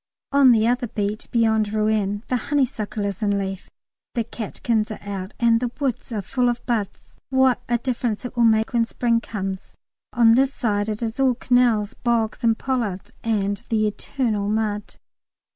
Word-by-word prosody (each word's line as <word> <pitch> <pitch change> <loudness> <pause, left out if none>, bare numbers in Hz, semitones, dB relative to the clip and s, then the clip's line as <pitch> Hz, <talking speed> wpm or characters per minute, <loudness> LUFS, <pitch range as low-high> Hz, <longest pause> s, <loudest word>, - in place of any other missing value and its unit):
On 280 -2 +6
the 220 -2 +4
other 245 +1 +1
beat, 210 0 -3
beyond 220 -3 +2
Rouen, 210 -1 0
the 255 - 0
honeysuckle 230 -5 -1
is 200 0 -4
in 205 -1 +1
leaf, 195 -1 -4 0.5
the 235 - +1
catkins 220 0 -2
are 215 - -6
out, 195 -1 -6
and 230 -1 +4
the 245 0 -1
woods 265 -4 -2
are 210 -3 -2
full 250 +4 +1
of 240 0 -3
buds. 220 -5 -3
What 260 -1 +3
a 240 - +3
difference 235 -3 -2
it 245 - -6
will 240 -1 +4
make 220 0 +3
when 235 -1 +3
spring 230 0 +1
comes. 195 -4 -5 0.4
On 235 -2 +5
this 265 +3 +3
side 205 -3 0
it 215 +2 -3
is 225 +2 -4
all 260 -2 +3
canals, 240 -4 +2
bogs, 235 -1 -1
and 225 -1 +3
pollards, 230 -8 -2
and 205 -3 -1
the 215 -1 +2
eternal 210 -1 -1
mud. 210 -1 -2
225 Hz, 175 wpm, -23 LUFS, 210-245 Hz, 0.5 s, On